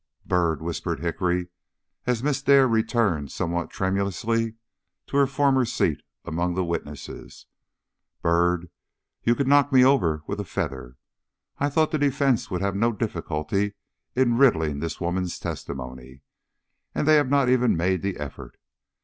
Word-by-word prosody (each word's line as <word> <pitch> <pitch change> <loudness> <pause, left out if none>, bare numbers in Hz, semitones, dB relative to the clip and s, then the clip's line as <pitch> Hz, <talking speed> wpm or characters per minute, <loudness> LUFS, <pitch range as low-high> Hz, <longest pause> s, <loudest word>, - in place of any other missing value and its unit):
"Byrd," 85 -4 +1
whispered 85 -4 -3
Hickory, 90 +1 -1 0.6
as 125 -1 0
Miss 140 -2 0
Dare 135 -1 +5
returned 110 - +1
somewhat 85 0 -2
tremulously 100 +4 -1 0.5
to - - -2
her 140 -1 +5
former 135 -1 +2
seat 110 -10 0 0.2
among 85 +3 -1
the 95 -1 0
witnesses 75 -4 -6 0.8
"Byrd, 85 0 +1 0.5
you 120 - +2
could 140 0 -1
knock 145 0 +4
me 130 -1 +6
over 85 - +2
with 100 +5 -4
a - - -1
feather. 65 -7 -5 0.6
I 145 - +1
thought 155 +2 +2
the 155 - 0
defence 140 -3 +1
would 90 0 -2
have 100 0 -1
no 115 +4 +2
difficulty 100 -1 -2 0.4
in 120 -2 +2
riddling 80 - +3
this 80 0 -4
woman's 90 0 -2
testimony, 65 -1 -7 0.7
and - - 0
they 155 - +6
have 145 -3 +2
not 140 -2 +3
even 125 -6 +3
made 90 +1 +1
the 100 -1 -2
effort. 70 -4 -8
95 Hz, 145 wpm, -25 LUFS, 85-125 Hz, 0.8 s, me